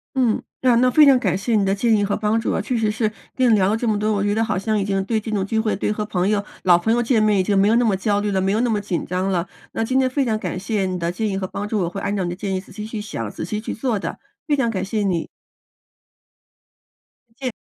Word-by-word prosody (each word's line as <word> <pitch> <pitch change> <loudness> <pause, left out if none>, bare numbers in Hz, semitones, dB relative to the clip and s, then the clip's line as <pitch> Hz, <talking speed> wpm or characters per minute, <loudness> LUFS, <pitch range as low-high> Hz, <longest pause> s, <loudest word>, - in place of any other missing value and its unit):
嗯， 245 -5 +2 0.2
那 250 -2 +4
那 250 +2 +4
非 300 +3 +7
常 270 -2 +7
感 190 -8 0
谢 220 +4 0
你 205 -2 +3
的 195 - +2
建 225 +2 +2
议 205 - +1
和 200 - 0
帮 215 +1 +1
助 225 - -1
啊， - - 0
确 250 - -2
实 220 -2 +1
是 215 0 -1 0.2
跟 255 -2 +3
你 - - +6
聊 190 -2 +3
了 215 - +2
这 230 +1 -2
么 215 -1 +2
多， 215 +1 0
我 200 - 0
觉 205 0 +1
得 225 - +2
好 225 - -1
像 215 +1 0
已 - - 0
经 195 -1 0
对 220 +1 0
这 220 +1 -6
种 200 -3 0
聚 220 +3 -1
会， 220 -1 0
对 205 - -1
和 210 0 -2
朋 185 -2 0
友 205 -1 +1 0.2
老 180 -2 +6
朋 220 +6 +1
友 240 - +2
见 230 -2 +2
面 210 -2 +3
已 - - +5
经 200 +2 +1
没 195 +1 +4
有 220 - +4
那 245 - +3
么 210 -5 +2
焦 205 +1 +1
虑 205 0 -1
了、 195 -1 0
没 190 +1 +1
有 215 - +1
那 245 - +1
么 215 -2 +1
紧 190 -4 -3
张 185 +2 -1
了。 175 -1 -1 0.2
那 - - -2
今 260 +4 +1
天 260 - +3
非 270 +2 0
常 220 -3 0
感 185 - -4
谢 200 0 -1
你 185 -1 -2
的 170 0 -1
建 215 +5 -2
议 195 - -2
和 190 -1 -2
帮 205 +2 -5
助， 210 0 -1
我 175 -3 0
会 195 - -6
按 200 +1 -2
照 195 - -1
你 175 - -2
的 175 - -4
建 195 0 -3
议 185 - -2
仔 - - -18
细 210 +2 -7
去 220 -1 -5
想、 115 - -5
仔 - - -6
细 210 +5 -3
去 215 - -5
做 230 -2 -1
的， - - -5 0.3
非 295 - +3
常 270 -4 +1
感 190 -4 -2
谢 215 +1 -2
你。 185 -5 0 2.0
再 - - -32 0.2
见。 - - -7
210 Hz, 340 characters per minute, -21 LUFS, 195-225 Hz, 2.0 s, 非